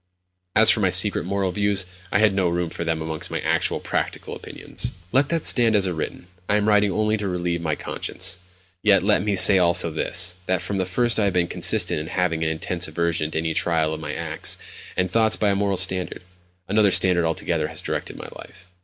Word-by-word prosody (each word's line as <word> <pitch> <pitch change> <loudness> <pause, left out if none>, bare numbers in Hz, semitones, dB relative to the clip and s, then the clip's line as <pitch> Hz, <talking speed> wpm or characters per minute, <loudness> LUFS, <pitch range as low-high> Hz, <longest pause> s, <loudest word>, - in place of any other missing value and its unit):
As - - +7
for - - +1
my - - +2
secret - - +2
moral 95 0 -2
views, 100 0 +1 0.3
I - - +2
had 105 -1 +3
no 95 -2 0
room 85 -1 -2
for 85 - -5
them 80 -1 -2
amongst 80 -1 -5
my - - -3
actual, - - 0
practical - - -4
opinions. - - -6 0.2
Let 135 +2 +2
that 165 -2 -1
stand 115 -3 +4
as 100 -2 +2
written: 85 0 -5 0.2
I 100 - +3
am 105 0 0
writing 105 -1 +3
only 110 +1 0
to 105 -1 -4
relieve 90 -2 -2
my 80 -2 -2
conscience. 95 - -3 0.4
Yet 100 -4 +3
let 105 -1 +2
me 100 0 -1
say 95 0 +7
also 85 -1 +4
this: 90 +3 0
that 95 -1 0
from 95 +1 -3
the 95 - -2
first 120 +4 +1
I 105 - +2
have 100 - 0
been 90 -1 +1
consistent 90 0 +1
in 80 - -6
having 85 -2 -1
an 80 - 0
intense 85 +2 -1
aversion 85 -2 -2
to 80 - -5
any 80 0 -2
trial 80 -2 +1
of 80 - -6
my - - -5
acts - - -2 0.4
and 90 0 -1
thoughts 110 +1 +3
by 105 -1 +1
a - - 0
moral 100 -1 -1
standard. 90 -1 0 0.4
Another 105 0 +3
standard 90 -2 +2
altogether 80 0 -2
has - - -6
directed - - -5
my - - -9
life.... 90 -1 -13
90 Hz, 215 wpm, -22 LUFS, 85-100 Hz, 0.4 s, As